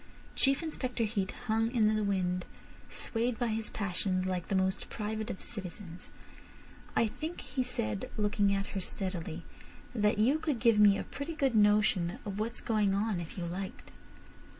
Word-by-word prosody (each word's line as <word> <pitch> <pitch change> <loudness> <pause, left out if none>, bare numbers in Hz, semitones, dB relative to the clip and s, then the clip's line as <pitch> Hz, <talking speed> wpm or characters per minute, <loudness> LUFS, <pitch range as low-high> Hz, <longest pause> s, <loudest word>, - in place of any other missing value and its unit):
Chief 275 +4 +3
Inspector 255 -6 -2
Heat 205 -3 0 0.2
hung 225 0 +2
in 215 -3 +3
the 215 - +1
wind, 180 -2 0 0.4
swayed 230 0 0
by 240 0 0
his 220 0 -2
passions 185 -1 -1
like 180 -2 -2
the 195 - 0
most 190 0 0
private 220 +1 -3
of 190 - -4
citizens. 185 -4 -6 0.9
"I - - +4
think," 315 +10 -5
he 260 - -2
said, 110 - -1
looking 205 -1 +2
at 195 0 +1
her 195 - -1
steadily, 175 -3 -4 0.5
"that 210 -3 +2
you 255 +9 +4
could 300 -5 0
give 230 -2 +4
me 205 -1 +7
a - - -2
pretty 295 +4 -5
good 275 -5 +2
notion 205 -4 +4
of 200 -1 -4
what's 230 +3 -3
going 210 -3 +2
on 205 -2 0
if 170 +2 -7
you 175 - -2
liked." 185 +3 -5
210 Hz, 170 wpm, -32 LUFS, 190-230 Hz, 0.9 s, me